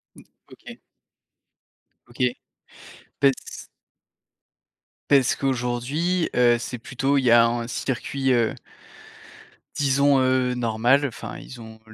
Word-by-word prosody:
Mmh. - - -16 0.3
OK. - - -13 1.3
OK. 120 +1 -4 1.0
Parce 135 -2 -1 1.4
parce 135 -4 +4
qu'aujourd'hui, 135 +7 -1
heu, 120 -1 +4
c'est 125 +1 -6
plutôt 135 +4 -1
il 135 - +1
y 120 - +3
a 120 0 +7
un 120 0 -3
circuit, 130 +2 -2
heu 120 -2 +2 1.2
disons, 140 0 +3
heu, 130 -1 +1
normal 120 +4 +1
enfin 120 -6 -7
ils 120 -3 -11
ont 110 0 -12
125 Hz, 105 wpm, -23 LUFS, 120-135 Hz, 1.4 s, a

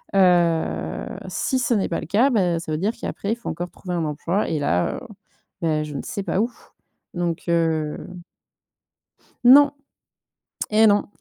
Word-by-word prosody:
heu, 175 -3 +2 0.2
si 260 - -1
ce 245 -1 +1
n'est 200 - 0
pas 165 - -1
le - - -6
cas, 225 +10 +3
bah 180 -7 +2
ça 165 -1 -6
veut 155 - 0
dire 210 +5 0
qu'après 205 +2 -3
faut 235 - -7
encore 175 0 -5
trouver 180 -2 -6
un 165 -2 -1
emploi 165 +7 -1
et 155 - -1
là, 90 -11 0
heu, - - -8 0.6
ben, 155 -2 +1
je 150 - -8
ne - - -3
sais 215 -6 -4
pas 195 - 0
où. 235 - 0 0.6
Donc 175 -1 -2
heu 160 -2 +1 1.5
Non! 280 +3 +8 1.0
Eh 220 +1 +5
non! 205 0 +3
175 Hz, 165 wpm, -23 LUFS, 165-215 Hz, 1.5 s, Non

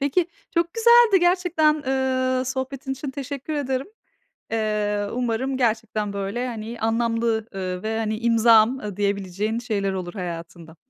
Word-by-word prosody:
Peki, 285 +5 +1 0.3
çok 335 0 +1
güzeldi 465 -4 +6
gerçekten, 350 -4 +2
eee, 260 -1 +1
sohbetin 265 +1 -4
için 270 +1 -5
teşekkür 280 +2 -6
ederim. 270 -2 -1 0.7
Eee, 210 -2 0
umarım 250 +2 -1
gerçekten 220 -4 0
böyle, 200 +5 -3
hani, 230 0 -6
anlamlı, 230 0 0
ııı, 185 -1 -4
ve 220 +1 -2
hani 215 -1 -1
"imzam" 230 -2 +4
diyebileceğin 200 +2 -1
şeyler 205 -5 -1
olur 180 -2 -4
hayatında. 170 -3 -7
230 Hz, 125 wpm, -23 LUFS, 210-265 Hz, 0.7 s, güzeldi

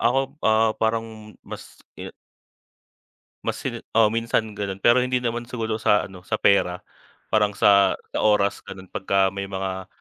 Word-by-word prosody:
Ako, 125 +3 +2 0.3
ah, 110 0 +3
parang 110 -1 -3
mas - - -8 0.4
e - - -7 1.3
mas - - -2
hin - - -4 0.2
oo, 110 -2 +6
minsan 115 -1 -1
gano'n 100 -1 -5
pero 120 +2 +6
hindi 125 0 0
naman 120 0 -3
siguro 115 -3 -3
sa 105 - +3
ano 95 -2 -11
sa 90 - -3
pera 90 -2 +2 0.5
parang 105 -2 +2
sa, 100 -1 +4 0.2
sa - - -2
oras 105 -2 +2
gano'n 95 -1 -9
pagka 95 0 +1
may 100 0 -5
mga 95 -1 -4
105 Hz, 155 wpm, -23 LUFS, 100-115 Hz, 1.3 s, oo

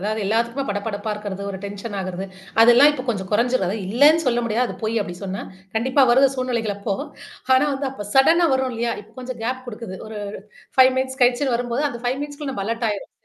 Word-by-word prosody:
அதாவது 215 +3 -2
எல்லாத்துக்குமே 235 +5 0
படபடப்பா 205 +1 -3
இருக்கிறது, 205 -2 -6
ஒரு 190 - -6
டென்ஷன் 200 +1 -6
ஆகுறது. 185 +1 -4 0.3
அதெல்லாம் 240 +5 +8
இப்போ 260 -3 -5
கொஞ்சம் 190 -5 -2
குறைஞ்சிரும் 235 -2 +2
அது 205 - -2
இல்லேன்னு 295 +8 +5
சொல்ல 240 -1 +2
முடியாது. 235 +2 +1
அது - - -7
பொய் 225 +1 -1
அப்பிடி 175 -3 -7
சொன்னா. 190 0 -4 0.3
கண்டிப்பா 260 +4 +3
வருது 265 +2 +6
சூழ்நிலைகள் 235 -5 -1
அப்போ. 200 0 -2 0.6
ஆனா 260 - +4
வந்து 270 0 -2
அப்ப 205 -6 -8
சடனா 330 +6 +5
வரும் 260 -1 0
இல்லயா! 235 0 -1
இப்ப 215 +2 -22
கொஞ்சம் 250 -1 -6
கேப் 255 +2 -3
குடுக்குது. 215 -5 -7
ஒரு 215 -1 -7 0.6
5 260 0 +7
மினிட்ஸ் 260 +1 -2
கழிச்சுன்னு 245 +1 +2
வரும்போது, 245 +3 -2
அந்த 235 - -7
5 250 +2 0
மினிட்ஸ்குள்ள 290 -1 -5
நம்ம 195 - -3
அலர்ட் 230 +1 -1
ஆயிரும். 205 -2 -5
235 Hz, 200 wpm, -22 LUFS, 210-260 Hz, 0.6 s, அதெல்லாம்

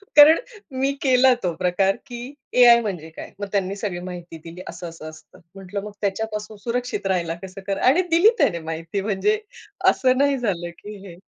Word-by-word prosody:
कारण 300 +2 +9 0.4
मी 270 +1 +2
केला 260 -1 +5
तो 175 -2 0
प्रकार, 185 +2 +1
की 245 +2 -8 0.3
एआय 235 -1 +8
म्हणजे 175 -7 -5
काय? 160 - -10
मग 205 - -4
त्यांनी 195 -1 -1
सगळी 195 -4 -4
माहिती 175 -2 -8
दिली. 170 +2 -9
असं-असं 165 -2 -8
असतं. 155 0 -16 0.2
म्हंटलं 195 +1 -6
मग 210 - -7
त्याच्यापासून 210 +1 -3
सुरक्षित 245 -3 -3
राहायला 170 -3 0
कसं 190 +1 -9
करा 195 - -1
आणि 315 +8 +5
दिली 345 +7 +6
त्याने 170 -5 +2
माहिती 165 +4 -4
म्हणजे 215 - 0 0.5
असं 255 -1 +2
नाही 280 0 +3
झालं 180 -8 -2
की 210 0 -9
हे. 170 - -11
200 Hz, 175 wpm, -22 LUFS, 175-245 Hz, 0.5 s, कारण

